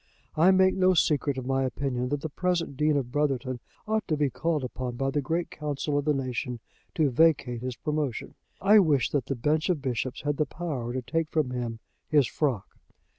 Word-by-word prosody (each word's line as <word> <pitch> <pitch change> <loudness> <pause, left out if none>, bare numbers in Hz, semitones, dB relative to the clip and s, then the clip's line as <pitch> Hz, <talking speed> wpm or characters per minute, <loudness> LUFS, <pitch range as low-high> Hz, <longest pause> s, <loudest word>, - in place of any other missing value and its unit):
I 165 +4 +5
make 190 0 +5
no 185 -1 +3
secret 145 -3 +2
of 130 - -4
my 135 0 +1
opinion 130 -1 -2
that 145 0 -1
the 160 - -4
present 175 -2 -1
Dean 150 +1 +2
of 125 -3 -3
Brotherton 135 -3 -1 0.3
ought 220 0 0
to 155 - 0
be 145 -2 +1
called 160 -1 -1
upon 125 -1 -4
by 135 +2 -1
the 145 - 0
great 165 +5 -2
Council 150 -1 -3
of 145 0 0
the 150 - +3
Nation 125 -2 -3 0.4
to 150 -4 +2
vacate 130 -4 +3
his 125 -1 -4
promotion. 150 -3 -3 0.3
I 210 +2 +6
wish 150 - +3
that 145 -3 -1
the 135 - -1
bench 150 +7 0
of 175 -4 +1
bishops 130 -2 -3
had 145 -1 -1
the 150 - +1
power 140 -8 -4
to 130 0 -3
take 165 +3 -1
from 150 -5 0
him 120 -2 -4 0.3
his 150 -4 +5
frock. 125 -5 -2
145 Hz, 205 wpm, -27 LUFS, 130-155 Hz, 0.4 s, I